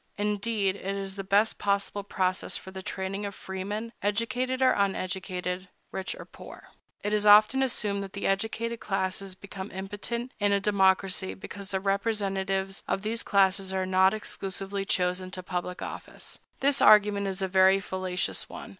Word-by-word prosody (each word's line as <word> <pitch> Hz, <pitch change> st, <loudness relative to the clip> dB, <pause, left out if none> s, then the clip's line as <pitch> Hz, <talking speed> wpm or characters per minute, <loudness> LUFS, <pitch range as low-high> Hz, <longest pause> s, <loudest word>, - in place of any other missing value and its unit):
Indeed, 205 Hz, -1 st, 0 dB
it 195 Hz, 0 st, -3 dB
is 195 Hz, -1 st, -4 dB
the 195 Hz, -, -4 dB
best 205 Hz, +3 st, +2 dB
possible 200 Hz, 0 st, 0 dB
process 185 Hz, -2 st, -1 dB
for 190 Hz, -, -10 dB
the 190 Hz, 0 st, -7 dB
training 190 Hz, +2 st, -4 dB
of 200 Hz, -1 st, -4 dB
freemen, 205 Hz, +5 st, -5 dB
educated 245 Hz, +5 st, 0 dB
or 260 Hz, -1 st, +5 dB
uneducated, 185 Hz, -1 st, -2 dB, 0.2 s
rich 190 Hz, -, -4 dB
or -, -, -9 dB
poor.It 205 Hz, +1 st, -9 dB
is 210 Hz, 0 st, +2 dB
often 215 Hz, +6 st, +7 dB
assumed 210 Hz, -6 st, 0 dB
that 195 Hz, -1 st, -7 dB
the 200 Hz, -, -4 dB
educated 225 Hz, +4 st, -1 dB
classes 190 Hz, -1 st, -2 dB
become 195 Hz, 0 st, -8 dB
impotent 205 Hz, +6 st, -4 dB
in 205 Hz, -1 st, +3 dB
a 200 Hz, -, +3 dB
democracy, 190 Hz, -, +2 dB
because 195 Hz, -, -9 dB
the 190 Hz, -, -1 dB
representatives 195 Hz, -1 st, -1 dB
of 195 Hz, -, -1 dB
those 225 Hz, +2 st, -1 dB
classes 195 Hz, -1 st, +2 dB
are 190 Hz, 0 st, 0 dB
not 190 Hz, +2 st, +4 dB
exclusively 195 Hz, -1 st, -4 dB
chosen 180 Hz, 0 st, 0 dB
to 185 Hz, 0 st, -6 dB
public 180 Hz, 0 st, -4 dB
office. -, -, -8 dB, 0.2 s
This 275 Hz, 0 st, +4 dB
argument 205 Hz, -1 st, +6 dB
is 190 Hz, 0 st, -2 dB
a -, -, +1 dB
very 190 Hz, +1 st, +5 dB
fallacious 185 Hz, -2 st, -2 dB
one. -, -, -8 dB
195 Hz, 160 wpm, -28 LUFS, 190-205 Hz, 0.2 s, often